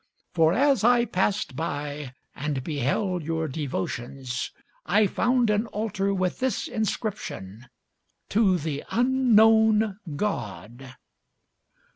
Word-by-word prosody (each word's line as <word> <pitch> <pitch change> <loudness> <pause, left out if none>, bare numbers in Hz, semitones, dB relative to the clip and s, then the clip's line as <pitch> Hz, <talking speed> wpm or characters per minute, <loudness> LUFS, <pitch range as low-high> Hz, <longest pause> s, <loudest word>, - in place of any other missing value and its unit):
For 160 -2 +4
as 270 +2 +3
I 240 0 +5
passed 205 - -1
by, 145 -3 -4 0.2
and 145 -3 -3
beheld 165 - -1
your 160 +1 -2
devotions, 130 -2 -4 0.3
I 210 +1 +3
found 240 +3 +2
an 210 +2 +1
altar 205 -2 -2
with 185 -2 -1
this 260 -1 -1
inscription, 130 - -4 0.6
TO 200 -4 +3
THE 150 -3 -4
UNKNOWN 220 -4 +4 0.2
GOD. 120 - -4
185 Hz, 100 wpm, -26 LUFS, 145-220 Hz, 0.6 s, I